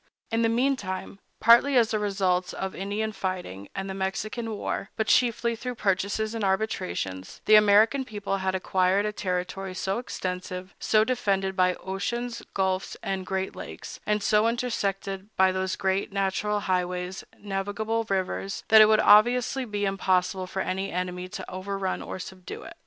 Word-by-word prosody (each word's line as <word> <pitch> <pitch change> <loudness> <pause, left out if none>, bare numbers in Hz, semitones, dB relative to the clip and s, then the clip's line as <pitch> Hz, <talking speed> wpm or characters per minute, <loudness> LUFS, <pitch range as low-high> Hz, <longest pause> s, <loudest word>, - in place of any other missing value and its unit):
In 225 0 +1
the 225 - +3
meantime, 230 -6 -1 0.2
partly 245 +4 +6
as 230 -2 +4
the 215 - +1
results 190 -3 0
of 190 0 -4
Indian 205 +3 -2
fighting 185 - -4
and 195 0 -3
the 190 - -4
Mexican 200 +4 -3
war, 205 -1 -3
but 220 - 0
chiefly 235 0 +2
through 250 +2 -5
purchases 200 +2 0
and 225 -2 -3
arbitrations, 185 - -2
the 215 - +4
American 215 +5 +6
people 205 -5 -3
had 190 0 -1
acquired 185 +2 +2
a 210 - 0
territory 185 -1 -3
so 195 +4 -1
extensive, 185 -4 -5
so 215 -1 +3
defended 195 -6 0
by 185 -1 +3
oceans, 235 +5 -4
gulfs, 190 -1 -1
and 190 -1 -3
great 190 0 -2
lakes, - - -8
and 210 -1 0
so 210 +2 +4
intersected 200 -5 -2
by 190 0 +5
those 185 0 -1
great 190 0 0
natural 200 +1 0
highways, 180 -1 -2
navigable 205 +3 -2
rivers, 195 0 -2
that 220 0 +9
it 215 - +8
would 215 0 +5
obviously 245 +5 +5
be 205 -2 -2
impossible 185 -1 0
for 190 +1 -2
any 190 +1 -2
enemy 180 0 -3
to 190 -1 -7
overrun 190 0 -3
or - - -6
subdue 185 0 -8
it. - - -10
195 Hz, 160 wpm, -27 LUFS, 185-215 Hz, 0.2 s, that